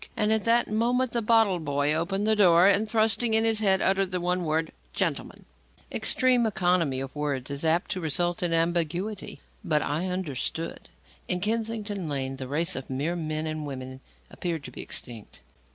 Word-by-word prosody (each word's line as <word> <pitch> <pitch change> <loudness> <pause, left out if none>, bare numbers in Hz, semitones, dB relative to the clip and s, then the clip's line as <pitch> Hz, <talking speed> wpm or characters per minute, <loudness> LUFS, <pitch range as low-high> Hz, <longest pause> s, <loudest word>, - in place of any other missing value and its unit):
And 215 0 +2
at 220 -2 0
that 235 +1 +3
moment, 240 +3 +1
the 235 - +1
bottle 220 -4 +3
boy 145 -1 0
opened 185 +6 -1
the 220 0 +3
door 180 -4 +5
and, 200 +2 +3
thrusting 220 +1 +2
in 220 - +3
his 225 -1 +3
head, 195 -3 +2
uttered 195 0 +2
the 180 -1 -2
one 180 0 -1
word: 160 +1 -1 0.2
"Gentleman." - - -2 0.5
Extreme 250 -2 +3
economy 175 -8 +1
of 135 +1 -7
words 140 -3 -2
is 140 +2 0
apt 165 +2 +1
to 185 -3 -3
result 175 +3 0
in 175 -2 0
ambiguity. 175 +4 -1 0.2
But 150 -2 +1
I 160 +6 -2
understood. 165 -3 -3 0.4
In 180 - +1
Kennington 215 -3 -2
Lane, 135 -2 -3
the 130 -1 -5
race 165 +6 0
of 130 - -6
mere 145 +6 -2
men 155 -2 -3
and 155 -1 -4
women 130 -1 -7 0.3
appeared 165 -4 -4
to - - -8
be - - -7
extinct. 115 -4 -4
175 Hz, 180 wpm, -26 LUFS, 155-210 Hz, 0.5 s, door